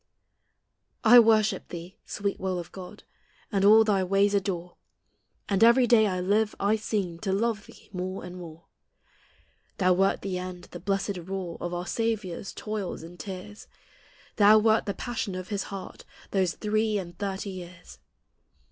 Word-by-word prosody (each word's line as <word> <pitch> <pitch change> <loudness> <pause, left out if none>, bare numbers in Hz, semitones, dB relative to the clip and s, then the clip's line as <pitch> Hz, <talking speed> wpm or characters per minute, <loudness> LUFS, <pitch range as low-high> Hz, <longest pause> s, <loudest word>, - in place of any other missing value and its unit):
I 240 +1 +9
worship 215 -3 +3
thee, 175 +5 -9
sweet 200 -1 -3
will 190 -1 -2
of 175 -1 -7
God! 185 -2 -10 0.5
And 195 -2 +1
all 215 +2 +8
thy 200 -3 +2
ways 200 +2 +2
adore; 180 -3 -2 0.7
And 200 +1 +2
every 235 +2 +6
day 220 -2 +5
I 185 -2 -1
live, 205 +4 +1
I 205 +2 +2
seem 200 -6 -2
To 190 - -2
love 210 +1 -1
thee - - -16
more 185 +1 -4
and 180 0 -8
more. 165 -2 -10 1.1
Thou 185 -1 +4
wert 195 +2 +1
the 185 -2 -2
end, 180 -1 -8
the 175 - -7
blessed 195 +1 -1
rule 180 -1 -5
Of 175 - -3
our 175 0 -3
Saviour's 215 -3 -2
toils 210 -6 -5
and 175 +2 -12
tears; 200 +2 -8 0.7
Thou 210 0 +7
wert 220 0 +3
the 200 - -2
passion 230 -5 -4
of 185 0 -6
his 200 -2 -2
heart 195 -2 -8 0.3
Those 185 -3 +1
three 215 0 0
and 175 -3 -6
thirty 200 0 -3
years. 180 -1 -11
195 Hz, 160 wpm, -27 LUFS, 180-215 Hz, 1.1 s, I